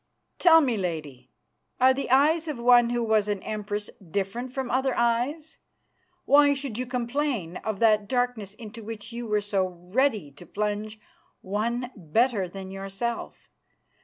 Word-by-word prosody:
"Tell 325 -2 +7
me, 250 -6 +1
Lady, 155 -9 -5 0.5
are 260 +1 +6
the 275 0 -4
eyes 310 +6 +4
of 300 -4 -3
one 240 0 +5
who 240 0 0
was 220 -2 +2
an 205 -2 -2
Empress 210 -1 -3 0.2
different 200 +8 -3
from 260 -1 -3
other 265 +1 +1
eyes? 250 +7 0 0.7
Why 285 +1 +6
should 265 -5 -5
you 255 - -3
complain 240 - -2
of 215 -3 -4
that 215 -2 +4
darkness 245 -5 -1
into 225 0 -10
which 225 +1 -7
you 235 0 -5
were 210 -1 +1
so 200 -2 0
ready 185 - -1
to 145 +6 -14
plunge 210 +1 -3 0.4
one 235 +6 -2
better 200 - +1
than 190 +1 -8
yourself. 195 +4 -5
225 Hz, 150 wpm, -26 LUFS, 200-250 Hz, 0.7 s, Tell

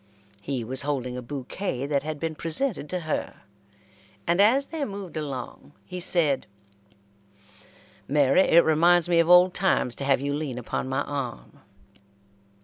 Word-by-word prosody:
He 130 +2 -3
was 130 +4 -5
holding 135 -4 -3
a 125 - -5
bouquet 135 +3 -4
that 140 -1 0
had 155 0 -5
been 165 0 -3
presented 165 - -2
to 180 -1 -3
her, 155 -1 -4 0.8
and 175 +3 +2
as 255 +7 +4
they 320 -1 -4
moved 200 -7 -6
along 145 -2 -6
he 180 -1 -6
said: 160 -6 +2 1.6
"Mary, 140 +3 +4
it 170 -2 +5
reminds 170 +2 +4
me 170 -1 +3
of 165 0 +2
old 180 +1 +7
times 180 -10 +1
to - - -5
have 135 -1 +2
you 140 +1 -2
lean 145 -4 -4
upon 125 +2 -4
my 135 +2 0
arm." 130 - -6
150 Hz, 150 wpm, -25 LUFS, 135-175 Hz, 1.6 s, old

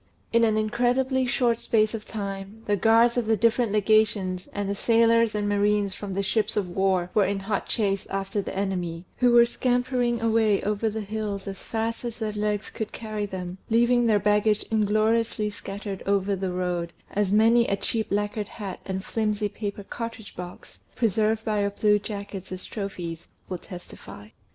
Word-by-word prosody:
In 230 0 +5
an 220 -1 +3
incredibly 250 +4 +1
short 240 -2 +2
space 215 -2 +2
of 220 -2 -6
time, 200 0 -6
the 205 - +2
guards 230 +4 +4
of 235 -3 0
the 220 -1 +3
different 230 0 +2
Legations 210 -3 +2
and 205 -1 -3
the 200 - 0
sailors 230 +1 +3
and 205 -1 0
marines 205 -1 +2
from 195 -2 -6
the 200 - 0
ships 215 +2 0
of 200 -3 +1
war 185 -1 +1
were 205 -3 +4
in 195 0 -1
hot 200 0 -2
chase 200 -4 0
after 195 +1 -2
the 190 - -6
enemy, 180 -3 -2
who 245 -1 +4
were 240 0 +7
scampering 245 0 0
away 225 -2 +3
over 210 +2 0
the 220 +1 -4
hills 205 -1 -4
as 195 -1 -6
fast 225 +1 -3
as 235 -2 -4
their 220 -2 -3
legs 210 0 -2
could 220 -1 -5
carry 215 -2 -4
them, 185 -1 -6
leaving 240 +1 +4
their 215 -2 +4
baggage 210 +1 +2
ingloriously 215 0 +1
scattered 200 -1 -6
over 200 0 +2
the 190 -1 -2
road, 180 -1 -2 0.2
as 205 -2 0
many 230 +3 +5
a 200 - 0
cheap 220 +1 -2
lacquered 205 +1 -1
hat 200 -4 -7
and 190 0 -3
flimsy 210 -2 -1
paper 205 0 -5
cartridge 230 0 -7
box, 180 0 -9 0.2
preserved 220 -1 +1
by 210 -2 +1
our 200 - +1
Blue 210 +1 +2
Jackets 200 -3 -7
as 185 0 -5
trophies, 175 -5 -5 0.2
will 180 -2 -4
testify. 175 - -11
210 Hz, 180 wpm, -26 LUFS, 195-225 Hz, 0.2 s, were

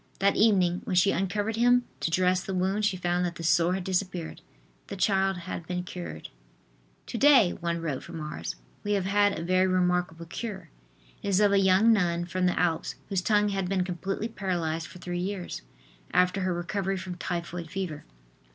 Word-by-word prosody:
That 200 +1 +2
evening, 185 -5 +3
when 185 - -1
she 180 +2 +5
uncovered 205 +4 -1
him 245 +1 +4 0.2
to - - -1
dress 180 +2 +2
the 190 - -4
wound, 190 +3 +1
she 195 -3 +1
found 175 0 0
that 175 -1 -2
the 165 - -7
sore 170 +2 +3
had 190 - -3
disappeared. 185 -2 -2 0.5
The - - -6
child 195 -1 +2
had 170 -1 -6
been 180 0 -2
cured. 175 - -7 0.8
"To 230 - -5
day," 265 -10 +6
one 170 -2 -3
wrote 150 -6 -3
from 170 -1 -8
Ars, 150 - -5 0.3
"we 205 - 0
have 195 -2 0
had 205 +1 +3
a 165 - -4
very 185 +2 +3
remarkable 180 -2 0
cure. 210 +4 -6 0.5
It - - -5
is 190 -1 +3
of 205 -1 +4
a 200 - +4
young 195 +4 +5
nun 175 -4 +1
from 180 +1 0
the 180 - 0
Alps 160 -7 0
whose 195 -2 0
tongue 210 +1 +2
had 195 -2 -2
been 190 -2 +1
completely 190 +4 -3
paralyzed 170 -7 -2
for 180 - -12
three 175 0 -4
years, 185 0 -4 0.5
after 180 +2 +2
her 185 0 0
recovery 195 +2 -2
from 185 0 -5
typhoid 175 -1 -4
fever. 185 -5 -4
185 Hz, 190 wpm, -28 LUFS, 175-195 Hz, 0.8 s, day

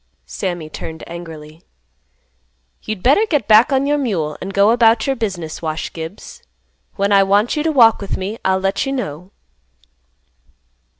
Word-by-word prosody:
Sammy 155 - -4
turned 160 +1 -8
angrily. 160 -2 -10 1.2
"You'd 215 -4 -6
better 285 - +4
get 295 - 0
back 220 +5 +6
on 270 0 +2
your 290 +1 +1
mule, 170 - -2
and 190 - -5
go 200 +2 +4
about 230 -1 +3
your 270 -1 0
business, 185 -9 -4
Wash 155 -1 -4
Gibbs. 165 +5 -9 0.5
When 200 +1 0
I 200 -1 +6
want 200 +4 +2
you 300 - -1
to 320 +1 0
walk 230 -7 +5
with 200 - -4
me, 200 +4 -5
I'll 190 0 +2
let 195 +1 -1
you 270 - -2
know." 180 - -5
200 Hz, 160 wpm, -18 LUFS, 165-235 Hz, 1.2 s, back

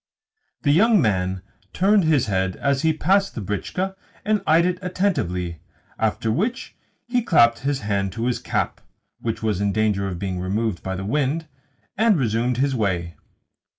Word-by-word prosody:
The 145 - +3
young 215 +7 +5
man 95 - 0 0.3
turned 195 0 +3
his 155 -5 +3
head 95 -2 -1
as 140 -1 0
he 160 - +3
passed 195 +6 +1
the - - -3
britchka 140 - -3 0.3
and 210 -1 +2
eyed 165 +2 +5
it 180 0 0
attentively; 90 - -1 0.4
after 110 0 0
which 215 - -2 0.3
he 245 0 +1
clapped 120 - +4
his 140 0 -1
hand 100 -2 -1
to 115 +2 -3
his 125 -1 0
cap - - -2 0.4
(which 115 -1 -4
was 105 -3 0
in 100 0 +1
danger 100 -1 +1
of 90 -2 -4
being 95 0 -3
removed 100 +1 -1
by 95 0 -4
the 95 +1 -5
wind) 145 +7 0 0.5
and 220 -4 +4
resumed 120 -1 0
his 135 +1 +1
way. 90 -7 -1
115 Hz, 165 wpm, -23 LUFS, -, 0.5 s, young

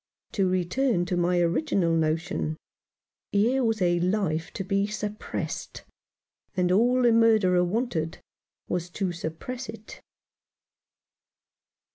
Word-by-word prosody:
To 195 -3 +1
return 185 +3 +1
to 180 - -1
my 175 0 +2
original 170 - +1
notion: 155 - -1 0.7
here 240 +6 +2
was 225 -4 +1
a 175 -1 +2
life 175 -4 0
to - - -3
be 200 +1 0
suppressed, 210 0 -5 0.7
and 180 -1 +2
all 245 +6 +3
the 240 - +5
murderer 215 -6 +4
wanted 180 -5 -1 0.5
was 175 -1 -2
to 185 0 -2
suppress 175 +10 -6
it. 220 -1 -10
185 Hz, 110 wpm, -26 LUFS, 175-220 Hz, 0.7 s, the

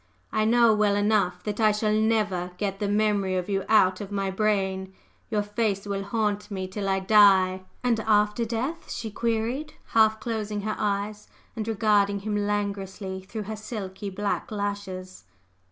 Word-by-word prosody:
I 215 0 +1
know 235 0 +5
well 210 -1 +2
enough 205 -4 +1
that 210 0 -4
I 215 -1 +5
shall 210 0 0
never 210 -5 +1
get 195 -2 -2
the 205 - -1
memory 205 -2 +1
of 180 -1 -2
you 195 -1 0
out 190 -4 +4
of 205 -1 -7
my 195 -1 -1
brain; 190 -2 -1 0.3
your 210 -3 0
face 205 -1 -1
will 200 -1 -2
haunt 210 0 -1
me 190 -2 -4
till 195 +1 -3
I 195 0 +2
die!" 190 -2 +5 0.2
"And 240 -3 +2
after 210 +1 +2
death?" 245 +9 -3
she 225 -2 -4
queried, 235 +7 -2
half 220 -1 +4
closing 215 -2 -3
her 215 +1 -2
eyes, 205 0 -2 0.3
and 220 -1 -4
regarding 205 -2 +2
him 210 +1 -2
languorously 200 -2 -2
through 210 +3 -6
her 215 +2 -5
silky 210 -2 -6
black 200 +1 -2
lashes. 200 -3 -5
205 Hz, 165 wpm, -26 LUFS, 195-215 Hz, 0.3 s, know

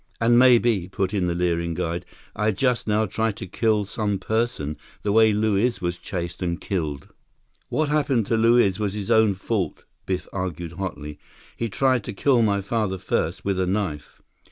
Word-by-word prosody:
"And 120 +1 +4
maybe," 120 -7 +4
put 95 +1 -1
in 95 -3 +1
the 85 - -1
leering 85 -1 0
guide, 85 +2 -3 0.3
"I 105 +1 +1
just 125 +4 0
now 110 +1 +2
try 110 +2 -1
to - - -7
kill 105 +2 +1
some 105 0 -1
person, 95 -7 -2 0.3
the 105 - 0
way 110 +1 +5
Luiz 110 +3 +1
was 85 0 -3
chased 85 -3 -5
and 85 -2 -1
killed." 80 -7 -3 0.6
"What 155 -1 0
happened 140 -7 +1
to 115 - 0
Luiz 115 -3 +4
was 105 -2 -1
his 100 -2 -3
own 110 -3 +4
fault," 95 0 -3 0.2
Biff 95 -1 -2
argued 90 -3 -4
hotly. 80 -5 -6 0.4
"He 115 - -3
tried 130 +3 +1
to - - -5
kill 125 +4 +3
my 100 -3 +2
father 105 -2 -1
first, 90 -1 -2
with 100 -2 0
a 90 - +1
knife." 90 -6 -3
100 Hz, 180 wpm, -24 LUFS, 90-115 Hz, 0.6 s, way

